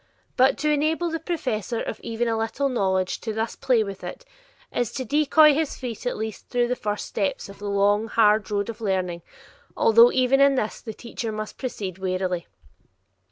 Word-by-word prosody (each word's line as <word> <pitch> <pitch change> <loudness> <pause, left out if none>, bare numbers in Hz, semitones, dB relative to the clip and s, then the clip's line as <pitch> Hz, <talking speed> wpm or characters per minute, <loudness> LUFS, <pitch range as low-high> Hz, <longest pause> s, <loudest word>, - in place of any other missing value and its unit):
But 260 +1 +4
to 300 0 +1
enable 315 +3 +1
the 325 - -2
possessor 255 - -2
of - - -4
even 230 +1 -2
a 225 - +1
little 225 +5 -1
knowledge 190 -6 0
to 220 - -3
thus 220 +1 -2
play 240 -4 +2
with 195 -2 -8
it, - - -7 0.5
is 245 - -1
to 260 - -4
decoy 300 +3 +5
his 310 0 -1
feet 245 -2 -5
at - - -2
least 220 -1 -6
through 245 -1 +1
the 250 - +1
first 210 -3 -3
steps 200 -1 -2
of 200 - -12
the 205 0 -4
long, 205 +2 +2
hard 215 -1 +3
road 205 -1 -1
of 230 0 -7
learning, 185 -4 -1 0.6
although 230 +2 +6
even 260 +1 +3
in 275 0 +5
this, 220 -4 -2
the 220 -3 -7
teacher 235 -1 -5
must 215 0 -6
proceed 195 -8 -5
warily. 185 -2 -2
225 Hz, 190 wpm, -24 LUFS, 205-260 Hz, 0.6 s, although